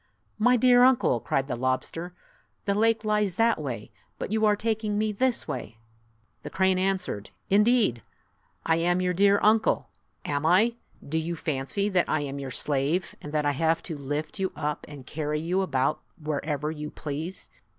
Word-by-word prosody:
" - - -41
My 250 - +5
dear 245 +1 +5
uncle!" 250 - +4
cried 135 +4 -1
the - - -2
lobster, 130 +8 -2 0.5
"the 200 - +2
lake 225 +1 +2
lies 210 -3 +1
that 230 -5 +2
way, 120 -7 -5 0.3
but - - -5
you 220 0 +3
are 210 - +4
taking 215 -1 -1
me 215 0 +1
this 245 +4 0
way." 110 - -5 0.6
The - - -7
crane 190 -1 +2
answered, 185 - -1 0.2
"Indeed! 210 - +4 0.6
I 160 0 +3
am 175 +2 +2
your 180 0 +1
dear 200 +2 +4
uncle! 220 +1 +3 0.4
Am 145 0 -1
I? 190 +9 +4 0.3
Do 160 +3 0
you 170 +2 -3
fancy 155 +6 -1
that 185 -3 +1
I 155 - +1
am 140 -1 -4
your 135 -1 -5
slave, 145 +7 0
and 150 - -7
that 150 -1 +1
I 145 - +3
have 165 +3 +1
to 165 - -4
lift 145 +5 -4
you 190 -1 0
up 150 -1 -3
and 145 -3 -10
carry 150 +1 -2
you 175 +4 0
about 140 -4 0 0.2
wherever 150 0 -2
you 150 -1 -6
please? 155 +5 -5
165 Hz, 180 wpm, -27 LUFS, 145-205 Hz, 0.6 s, My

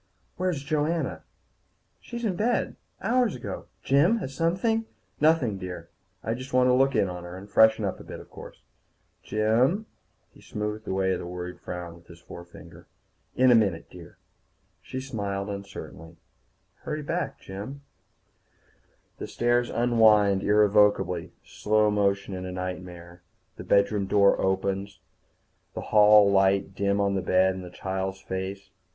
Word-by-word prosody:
"Where's 180 -6 -1
Joanna?" 155 +3 -1 0.8
"She's 235 0 -6
in 195 -4 0
bed. 230 +6 0 0.3
Hours 245 -4 +2
ago. 125 - -7 0.2
Jim, 155 +12 +3
has 135 -11 -5
something 190 - 0 0.2
?" - - -38
"Nothing, 150 -10 +3
dear. 90 -2 -7 0.3
I 115 - -1
just 130 +3 -8
want 125 0 +4
to - - +4
look 135 +1 +3
in 105 -3 +3
on 90 -1 -6
her. 90 +1 -8
And 95 +2 -11
freshen 110 +1 +4
up 95 - -3
a - - -10
bit, - - -9
of - - -15
course." - - -12 0.6
"Jim 120 - +1 0.2
" - - -44
He - - -18
smoothed 105 +1 -5
away 95 0 0
the - - -6
worried 90 0 -7
frown 90 -1 -7
with 85 0 -18
his 85 -1 -14
forefinger. 85 0 -13 0.5
"In 130 0 +5
a - - +7
minute, 100 -7 +1
dear." - - -13 0.6
She 130 - -6
smiled 100 -6 -4
uncertainly. 95 -4 -9 0.6
"Hurry 150 0 -5
back, 165 0 -3
Jim." 105 +9 -8 1.4
The - - -5
stairs 120 0 +1
unwind 110 -5 +4
irrevocably, 105 -4 +3
slow 105 0 +1
motion 100 -1 0
in 90 0 -5
a 90 - -5
nightmare. 90 -1 -7 0.3
The - - -9
bedroom 100 +1 +2
door 100 0 +4
opens, 95 +1 -1 0.8
the - - -4
hall 105 -1 +7
light 95 0 +2
dim 100 +1 0
on 100 -1 +1
the 95 - 0
bed 95 +1 +3
and 95 0 -7
the 90 - -9
child's 95 +1 -4
face. 95 +1 -6
100 Hz, 150 wpm, -26 LUFS, 95-125 Hz, 1.4 s, a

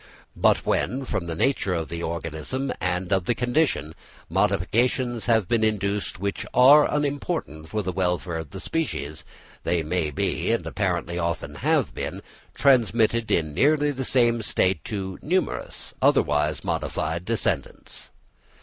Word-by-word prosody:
But - - +3
when, 135 +2 0
from 85 -8 -3
the 85 - -3
nature 100 -2 +1
of 80 -2 -3
the 85 0 -5
organism 85 - -3
and 90 +1 -1
of 95 -2 +1
the 120 - +1
conditions, 120 - 0 0.4
modifications 120 +5 +1
have 110 -5 +3
been 115 +1 +1
induced 100 -2 -1
which 100 +1 -2
are 140 +4 +7
unimportant 145 - -2
for 105 -1 -2
the 90 - -2
welfare 90 -1 -1
of 80 -3 -7
the 95 - -8
species, 75 - -3 0.4
they 85 -2 0
may 80 0 -1
be, 70 - -1
and - - -1
apparently 85 0 -2
often 85 -1 -2
have - - +1
been, - - -5 0.3
transmitted 115 -3 +3
in 80 -3 +1
nearly 145 - +3
the 135 -1 -4
same 120 -2 +2
state 95 -4 +1
to 95 -3 -4
numerous, 185 +4 -2
otherwise 75 +1 +2
modified, 80 +3 -2
descendants. 115 +3 -3
100 Hz, 140 wpm, -25 LUFS, 85-125 Hz, 0.4 s, are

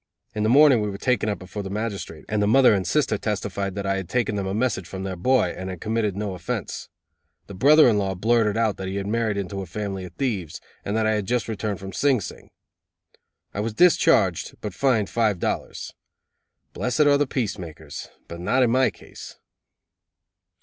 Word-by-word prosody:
In 105 - -3
the 110 - +2
morning 135 -2 +6
we 105 - -1
were 100 - -5
taken 110 -1 +1
before 95 +3 -7
the 95 - -6
magistrate, 100 -6 -5
and 105 0 0
the 105 - +2
mother 125 +2 +6
and 95 -3 -1
sister 125 - +1
testified 100 -2 -3
that 100 -1 -4
I 95 0 0
had 95 -3 -5
taken 120 -3 0
them 100 -2 -2
a 95 - -2
message 105 -6 -1
from 95 0 -6
their 95 -1 -4
boy, 110 0 +2
and 95 +1 -6
had 90 -2 -6
committed 110 -2 -1
no 105 -2 -3
offense. 90 -2 -5 0.6
The - - -10
brother 145 +10 +6
in 110 -4 +3
law 95 -1 -1
blurted 110 +2 +2
out 110 -3 +1
that 95 - -5
he 95 - -4
had 100 -1 -2
married 110 0 0
into 95 0 -4
a 95 - -7
family 95 +1 -4
of 90 - -11
thieves, 100 - -3 0.2
and 105 +2 -2
that 110 - +1
I 110 - +3
had 105 -3 -2
just 120 -3 0
returned 110 -2 -3
from 95 0 -8
Sing 140 +1 +2
Sing. 90 - -9 1.0
I - - -4
was 105 +1 -2
discharged, 140 - +3
but 105 -3 -5
fined 110 -2 +2
five 110 -3 +1
dollars. - - -3 0.8
Blessed 120 +6 -1
are 145 -1 +5
the 145 - +2
peacemakers, 85 - -5 0.2
but 85 - -8
not 125 +9 +2
in 120 - +2
my 130 +1 +4
case! - - -12
105 Hz, 205 wpm, -24 LUFS, 95-115 Hz, 1.0 s, morning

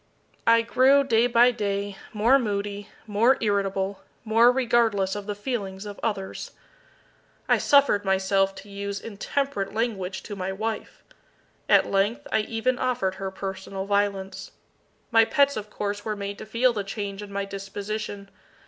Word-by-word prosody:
I 230 0 +6
grew, 265 +4 +4
day 235 -3 +3
by 240 +1 +5
day, 200 -3 -2 0.2
more 230 +6 +4
moody, 205 -3 -3 0.2
more 230 +5 +3
irritable, 195 -2 -1 0.2
more 230 +2 +5
regardless 230 -6 +2
of 205 0 -6
the 205 - -3
feelings 205 -3 -4
of 205 -1 -8
others. 195 -4 -3 0.9
I - - +4
suffered 280 -8 +4
myself 195 0 +1
to 205 - -12
use 200 0 -4
intemperate 215 -1 -3
language 195 -5 -2
to 205 - -7
my 190 0 -3
wife. 220 +3 -5 0.7
At - - +6
length, 220 +9 +1
I - - +3
even 230 +4 -1
offered 245 -7 0
her 195 - -2
personal 190 0 -5
violence. 200 -1 -1 0.6
My 225 -1 +6
pets 280 +4 +3
of 210 -1 -5
course 205 0 -4
were 215 -1 -2
made 200 0 -5
to - - -8
feel 235 +3 +2
the 205 -3 -2
change 200 0 -5
in 205 -1 -9
my 200 0 -2
disposition. 200 +1 -6
205 Hz, 150 wpm, -25 LUFS, 195-230 Hz, 0.9 s, I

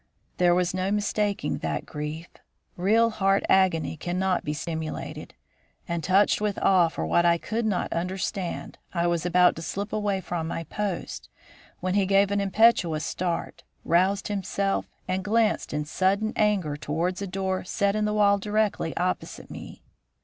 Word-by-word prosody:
There 175 -1 +4
was 180 0 +1
no 185 +1 -1
mistaking 205 -4 0
that 75 -1 -3
grief. 150 +2 -5 0.5
Real 225 +6 +3
heart 195 -2 +2
agony 185 -5 +3
cannot 180 +3 -1
be 150 - -2
simulated; 160 +1 -5 0.5
and, 170 -1 -2
touched 195 +5 +3
with 210 -2 -1
awe 185 -3 +4
for 115 - -4
what 170 - +3
I 170 0 +4
could 225 +5 -2
not 195 -4 -1
understand, 180 +1 -3 0.2
I 170 0 +1
was 170 0 0
about 180 0 +4
to - - -5
slip 200 +5 -4
away 205 -2 0
from 170 -3 -4
my 165 0 -3
post, 195 +2 -4 0.5
when 185 0 -1
he 200 -1 +2
gave 195 +1 +4
an 200 0 +1
impetuous 195 -6 +3
start, 175 -2 -3 0.2
roused 190 +4 +2
himself, 195 -1 -1 0.2
and 185 +1 -1
glanced 220 +1 +1
in 150 0 -2
sudden 195 +7 +1
anger 200 -8 +1
towards 165 +6 -2
a 200 - -3
door 190 0 -2
set 200 +2 0
in 215 0 +1
the 210 - 0
wall 200 -1 +4
directly 210 -5 -1
opposite 180 +1 -3
me. - - -10
185 Hz, 160 wpm, -26 LUFS, 170-200 Hz, 0.5 s, There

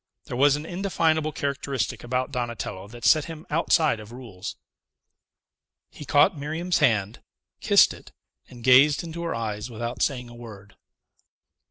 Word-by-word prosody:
There - - -6
was 140 +2 +4
an 150 +1 -6
indefinable 165 -4 0
characteristic 140 -2 -3
about 125 +2 -2
Donatello 120 -6 -4
that 120 +3 -9
set 155 -2 +5
him 160 -1 -9
outside 155 -5 +2
of 105 +1 -11
rules. 120 -7 -8 1.4
He 150 - -10
caught 145 +2 +4
Miriam's 160 +5 -2
hand, 110 -7 +1 0.4
kissed - - +5
it, - - -15 0.4
and 120 -2 -13
gazed 135 +5 +5
into 170 0 -7
her 170 -1 -3
eyes 110 0 -4
without 120 +1 -5
saying 125 -4 -1
a 120 - -12
word. 105 -4 -12
130 Hz, 145 wpm, -25 LUFS, 115-155 Hz, 1.4 s, set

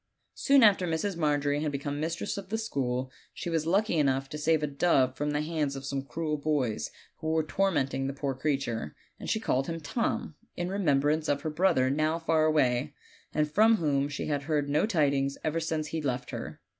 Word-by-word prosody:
Soon 275 -2 +4
after 195 -4 +5
Mrs. 170 +4 -1
Margery 145 -2 +1
had 155 -1 -1
become 145 +1 -3
mistress 165 +2 -2
of 195 -2 -7
the 220 - -1
school 130 - -2 0.2
she 170 - -4
was 160 -1 0
lucky 195 -1 +2
enough 135 -1 +1
to 150 - -5
save 155 0 +2
a - - +3
dove 140 -3 +2
from 145 +2 -2
the 150 0 0
hands 155 -3 -1
of 135 0 -7
some 135 0 -2
cruel 150 +3 -3
boys, 145 -7 -1 0.3
who 155 - -6
Avere 160 -1 +1
tormenting 135 -9 0
the 135 - -3
poor 140 0 -2
creature, 130 - -2 0.2
and - - -6
she 220 - +1
called 135 - 0
him 165 0 -3
Tom, 160 +2 -2 0.2
in 175 +1 -2
remembrance 155 -5 +1
of 145 0 +1
her 155 0 -3
brother 150 -6 +2
now 155 +3 +1
far 165 -1 +2
away, 145 -2 +2 0.4
and 150 -1 0
from 220 +6 +5
whom 145 -6 0
she 145 - -4
had 145 -2 -1
heard 150 -2 0
no 150 +8 +2
tidings 140 -7 +1
ever 155 +1 0
since 160 -2 -2
he 160 - -3
left 125 -3 -2
her. - - -6
150 Hz, 205 wpm, -29 LUFS, 140-165 Hz, 0.4 s, after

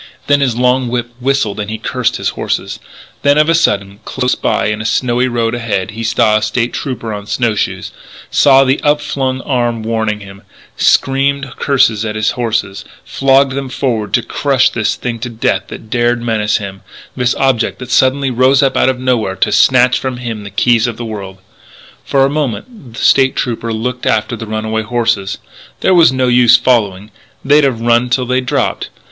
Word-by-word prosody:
Then 145 0 +2
his 130 -4 +1
long 125 +1 +2
whip 120 0 -3
whistled 125 -5 -1
and 105 0 -4
he 110 - -4
cursed - - -2
his - - -1
horses. - - -3 0.4
Then, 145 +1 +3
of 155 +1 +3
a - - +4
sudden, 100 -11 0
close 125 +1 -1
by - - -1
in 110 0 -2
the 110 - -5
snowy 125 +1 +1
road 120 -2 -1
ahead, 115 -5 -2
he 115 +2 -6
saw 110 -1 +2
a - - -2
State 115 +3 -1
Trooper 115 -5 -4
on 105 0 -7
snow 120 -1 0
shoes, 105 - -3 0.4
saw 135 -1 +5
the 135 +1 0
upflung 140 -3 -1
arm 120 -5 -1
warning 110 -2 -2
him 100 0 -12 0.3
screamed 135 0 +1
curses 115 -6 +2
at 110 -1 -4
his 110 0 0
horses, 110 -5 -2 0.2
flogged 135 0 +2
them 135 0 -4
forward 115 -6 -2
to 120 - 0
crush 135 +2 +1
this 110 -2 -1
thing 120 -2 -5
to 125 +2 -5
death 105 -4 -1
that 110 - -11
dared 120 0 +1
menace 110 -2 0
him 95 -2 -8 0.3
this 125 -1 0
object 130 -4 0
that 125 -1 -9
suddenly 130 +2 +2
rose 130 +3 +3
up 135 -1 +1
out - - +3
of 130 -1 -2
nowhere 120 -7 0
to - - 0
snatch 125 -1 +4
from 130 -2 -4
him 115 -4 -6
the 100 - -8
keys 115 +3 +2
of 120 - -5
the 120 - -5
world 100 -4 -7 0.7
For 135 -1 +2
a - - +2
moment 145 - -5
the - - -7
State 135 -1 +4
Trooper 115 -2 -3
looked 125 +3 -3
after 110 +2 0
the 115 0 -8
runaway 110 +1 -2
horses. 110 -3 -1 0.4
There 190 - +3
was 170 -6 +6
no 130 -1 0
use 120 -1 +5
following; 105 -5 0 0.3
they'd 145 +2 +4
have 135 -4 +1
to 115 - -8
run 120 +1 +2
till 125 +1 0
they 130 +1 0
dropped. 125 - -2
120 Hz, 195 wpm, -14 LUFS, 110-130 Hz, 0.7 s, was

